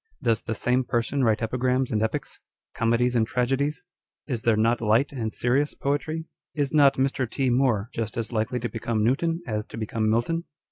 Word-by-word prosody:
Does 115 Hz, -1 st, +2 dB
the 110 Hz, -, -4 dB
same 125 Hz, +4 st, +1 dB
person 125 Hz, +3 st, 0 dB
write 110 Hz, -2 st, +2 dB
epi 120 Hz, +3 st, -2 dB
grams 130 Hz, +1 st, +1 dB
and 110 Hz, -, +1 dB
epics, 110 Hz, -, -3 dB, 0.3 s
comedies 115 Hz, +2 st, +1 dB
and 110 Hz, -2 st, +2 dB
tragedies? 135 Hz, +6 st, 0 dB, 0.4 s
Is 125 Hz, -6 st, -3 dB
there 115 Hz, -2 st, +2 dB
not 115 Hz, +2 st, +2 dB
light 115 Hz, +5 st, +3 dB
and 115 Hz, -5 st, -3 dB
serious 135 Hz, +6 st, 0 dB
poetry? 155 Hz, +3 st, -2 dB, 0.3 s
Is 145 Hz, -2 st, -1 dB
not 140 Hz, -3 st, +6 dB
Mr. 135 Hz, -2 st, 0 dB
T. 130 Hz, +1 st, 0 dB
Moore 120 Hz, -5 st, +2 dB
just 115 Hz, -1 st, -3 dB
as 115 Hz, -1 st, -3 dB
likely 115 Hz, +2 st, -1 dB
to 120 Hz, -, -1 dB
become 115 Hz, -1 st, -2 dB
Newton 165 Hz, +8 st, +1 dB
as 105 Hz, -5 st, -2 dB
to -, -, -9 dB
become 110 Hz, 0 st, -1 dB
Milton 165 Hz, +10 st, 0 dB
120 Hz, 190 wpm, -25 LUFS, 110-135 Hz, 0.4 s, not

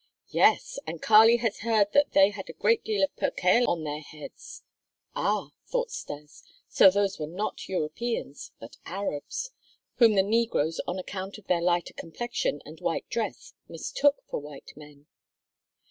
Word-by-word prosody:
"Yes, -, -, +3 dB
and -, -, -5 dB
Kali 225 Hz, +2 st, +7 dB
has 220 Hz, -, -1 dB
heard 215 Hz, -2 st, +1 dB
that 285 Hz, 0 st, +3 dB
they 195 Hz, +1 st, +6 dB
had 205 Hz, -2 st, -8 dB
a -, -, -7 dB
great 460 Hz, -1 st, +2 dB
deal 205 Hz, -3 st, 0 dB
of 195 Hz, -, 0 dB
percale 230 Hz, +7 st, +2 dB
on 165 Hz, -2 st, -1 dB
their 150 Hz, 0 st, -4 dB
heads." 150 Hz, 0 st, -11 dB, 0.5 s
"Ah!" -, -, 0 dB, 0.2 s
thought -, -, -1 dB
Stas, 150 Hz, -, -8 dB, 0.3 s
"so -, -, +7 dB
those 200 Hz, 0 st, 0 dB
were 150 Hz, -, -3 dB
not 185 Hz, +7 st, -5 dB
Europeans, 185 Hz, 0 st, -3 dB
but 115 Hz, -, -12 dB
Arabs, 200 Hz, -, -4 dB, 0.5 s
whom 230 Hz, -4 st, +6 dB
the 190 Hz, -, +4 dB
negroes 205 Hz, -7 st, 0 dB
on 175 Hz, -, -2 dB
account 190 Hz, +2 st, -6 dB
of 215 Hz, -, -16 dB
their 175 Hz, -2 st, +1 dB
lighter 175 Hz, 0 st, 0 dB
complexion 240 Hz, -, -3 dB
and -, -, -12 dB
white -, -, -2 dB
dress -, -, -4 dB, 0.2 s
mistook 285 Hz, 0 st, 0 dB
for -, -, -3 dB
white 145 Hz, -1 st, -11 dB
men." 145 Hz, -1 st, -15 dB
195 Hz, 160 wpm, -27 LUFS, 160-230 Hz, 0.5 s, Kali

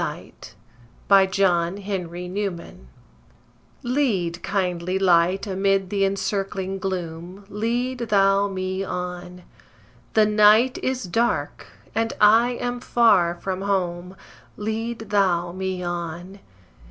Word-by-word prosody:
MICHELET -, -, -7 dB, 0.6 s
LEAD, 195 Hz, -1 st, +6 dB
KINDLY 180 Hz, 0 st, -1 dB
LIGHT 170 Hz, -2 st, -10 dB, 1.1 s
Lead, 210 Hz, -10 st, 0 dB
kindly 185 Hz, -2 st, -1 dB
Light, 185 Hz, +1 st, +3 dB
amid 195 Hz, -1 st, 0 dB
th' 200 Hz, -1 st, -1 dB
encircling 195 Hz, 0 st, -2 dB
gloom, 180 Hz, 0 st, -5 dB
Lead 240 Hz, +4 st, -2 dB
Thou 195 Hz, -1 st, +3 dB
me 190 Hz, 0 st, -3 dB
on; 180 Hz, -1 st, -6 dB, 0.7 s
The 215 Hz, -1 st, +6 dB
night 215 Hz, +4 st, +4 dB
is 255 Hz, -1 st, -2 dB
dark, 180 Hz, -, -1 dB, 0.3 s
and 225 Hz, +1 st, -1 dB
I 225 Hz, +4 st, +5 dB
am 245 Hz, 0 st, -3 dB
far 205 Hz, -9 st, +3 dB
from 190 Hz, +1 st, -4 dB
home, 180 Hz, -2 st, -2 dB, 0.4 s
Lead 220 Hz, +2 st, -3 dB
Thou 175 Hz, -4 st, +2 dB
me 185 Hz, 0 st, -4 dB
on. 175 Hz, +2 st, -5 dB
195 Hz, 105 wpm, -23 LUFS, 180-210 Hz, 1.1 s, LEAD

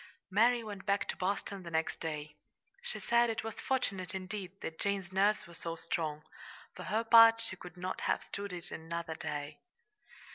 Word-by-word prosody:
Mary 230 Hz, +4 st, +4 dB
went 205 Hz, -2 st, -7 dB
back 200 Hz, 0 st, +1 dB
to -, -, -2 dB
Boston 195 Hz, +1 st, -2 dB
the 170 Hz, -, -7 dB
next 160 Hz, 0 st, -1 dB
day. 150 Hz, -2 st, -4 dB, 0.5 s
She 485 Hz, 0 st, -4 dB
said 235 Hz, 0 st, +4 dB
it 225 Hz, 0 st, -2 dB
was 225 Hz, 0 st, -5 dB
fortunate, 195 Hz, -8 st, -1 dB
indeed, 190 Hz, 0 st, -5 dB
that 160 Hz, 0 st, -5 dB
Jane's 195 Hz, -3 st, -1 dB
nerves 200 Hz, +3 st, +3 dB
were 170 Hz, -, -13 dB
so 165 Hz, 0 st, -4 dB
strong. 155 Hz, -2 st, -2 dB, 0.5 s
For -, -, -7 dB
her 220 Hz, +3 st, +1 dB
part, 230 Hz, 0 st, +9 dB
she 225 Hz, -4 st, -2 dB
could 180 Hz, -1 st, -11 dB
not 185 Hz, +1 st, -3 dB
have -, -, +1 dB
stood 200 Hz, 0 st, -5 dB
it 175 Hz, 0 st, -4 dB
another 165 Hz, 0 st, -4 dB
day. 150 Hz, -1 st, -5 dB
190 Hz, 180 wpm, -33 LUFS, 170-215 Hz, 0.5 s, part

